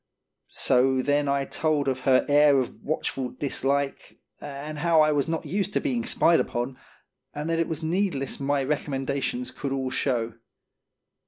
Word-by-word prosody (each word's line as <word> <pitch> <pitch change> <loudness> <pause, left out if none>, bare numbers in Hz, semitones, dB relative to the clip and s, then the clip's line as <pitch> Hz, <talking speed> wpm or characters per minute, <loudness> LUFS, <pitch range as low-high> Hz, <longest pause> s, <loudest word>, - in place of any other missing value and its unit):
So 130 0 +3
then 145 +1 +1
I 140 0 +1
told 150 -1 0
of 130 -1 0
her 130 -1 +5
air 145 -1 +5
of 130 -2 -2
watchful 135 -4 -2
dislike, 140 0 -2 0.2
and 145 +1 -7
how 165 0 +3
I 155 0 +4
was 145 0 +1
not 165 0 -2
used 200 +1 -2
to - - +2
being 245 -5 -1
spied 170 -8 +3
upon, 120 +2 -3 0.6
and 150 +2 -4
that 165 - +1
it 165 - +1
was 160 0 -4
needless 160 -5 -1
my 140 0 0
recommendations 140 - -2
could 140 - -5
all 135 -1 -2
show. 120 -4 -1
145 Hz, 160 wpm, -26 LUFS, 135-160 Hz, 0.6 s, her